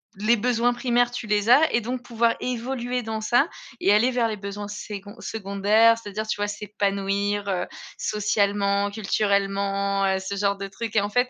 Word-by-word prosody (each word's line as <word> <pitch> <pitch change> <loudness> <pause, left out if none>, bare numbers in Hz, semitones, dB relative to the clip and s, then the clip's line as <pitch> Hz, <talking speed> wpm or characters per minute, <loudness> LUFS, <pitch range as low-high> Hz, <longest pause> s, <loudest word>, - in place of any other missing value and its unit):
les 215 +4 +3
besoins 245 +2 +1
primaires 245 0 +1
tu 245 -2 -5
les 210 +1 +1
as 305 +5 +6
et 235 - +2
donc 245 +3 -4
pouvoir 230 -1 +1
évoluer 250 0 -3
dans 220 0 -4
ça 240 +7 +3 0.3
et 200 - +4
aller 220 +4 +4
vers 245 -2 +1
les 215 -1 -4
besoins 200 +1 -6
sécon 205 -1 -7
secondaires, 210 +2 +2
c'est-à-dire, 215 0 -5
tu 215 - -1
vois, 205 0 -1
s'épanouir, 200 0 -1
heu, 180 -2 -1 0.3
socialement, 200 -1 +1
culturellement, 200 -1 0
heu, 190 0 +2
ce 190 +1 -5
genre 200 0 0
de 195 0 -5
trucs 225 +3 -6
et 210 - +5
en 205 - -2
fait. 245 +3 +2
210 Hz, 180 wpm, -24 LUFS, 200-235 Hz, 0.3 s, as